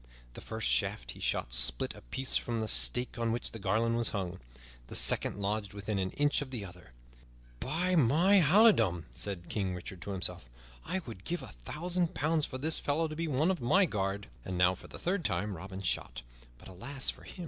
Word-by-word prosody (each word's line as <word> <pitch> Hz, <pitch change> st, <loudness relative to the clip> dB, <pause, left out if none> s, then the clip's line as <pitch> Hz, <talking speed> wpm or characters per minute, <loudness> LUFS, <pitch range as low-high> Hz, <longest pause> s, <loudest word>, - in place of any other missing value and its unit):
The -, -, -9 dB
first -, -, -3 dB
shaft -, -, 0 dB
he -, -, -12 dB
shot -, -, -1 dB
split 60 Hz, 0 st, +3 dB
a -, -, -13 dB
piece 130 Hz, -, -3 dB
from 120 Hz, -1 st, 0 dB
the 110 Hz, -1 st, -2 dB
stake 125 Hz, +2 st, +2 dB
on 115 Hz, -1 st, +1 dB
which 120 Hz, +1 st, -2 dB
the 115 Hz, -, -8 dB
garland 110 Hz, +4 st, +1 dB
was 120 Hz, -1 st, +2 dB
hung; 95 Hz, -2 st, -4 dB, 0.5 s
the -, -, -7 dB
second -, -, +4 dB
lodged 100 Hz, 0 st, -2 dB
within 100 Hz, 0 st, -3 dB
an 95 Hz, 0 st, 0 dB
inch 145 Hz, 0 st, +2 dB
of 140 Hz, -, -5 dB
the 120 Hz, -6 st, -4 dB
other. 90 Hz, -8 st, -13 dB, 0.7 s
"By 175 Hz, +7 st, 0 dB
my 165 Hz, -, +5 dB
halidom," 140 Hz, -, +5 dB
said 90 Hz, +4 st, -2 dB
King 95 Hz, -4 st, -2 dB
Richard 90 Hz, 0 st, -8 dB
to -, -, -7 dB
himself, 90 Hz, -10 st, -4 dB, 0.3 s
"I 190 Hz, -, -2 dB
would 110 Hz, -6 st, -9 dB
give 175 Hz, +1 st, -3 dB
a -, -, -8 dB
thousand 170 Hz, -, -3 dB
pounds 155 Hz, +1 st, +1 dB
for 130 Hz, -, -6 dB
this 155 Hz, +4 st, 0 dB
fellow 155 Hz, +3 st, 0 dB
to 155 Hz, -, -6 dB
be 165 Hz, +1 st, -2 dB
one 155 Hz, +5 st, +2 dB
of 185 Hz, -, -3 dB
my 190 Hz, +12 st, +4 dB
guard!" 100 Hz, -, -2 dB, 0.2 s
And 90 Hz, -1 st, -4 dB
now, 90 Hz, +1 st, +5 dB
for 95 Hz, -, -11 dB
the -, -, -9 dB
third 180 Hz, 0 st, -1 dB
time 100 Hz, -, -1 dB
Robin 95 Hz, +3 st, -7 dB
shot; -, -, -2 dB, 0.3 s
but, -, -, -15 dB
alas 120 Hz, +9 st, -2 dB
for -, -, -17 dB
him! -, -, -12 dB
110 Hz, 210 wpm, -31 LUFS, 95-150 Hz, 0.7 s, my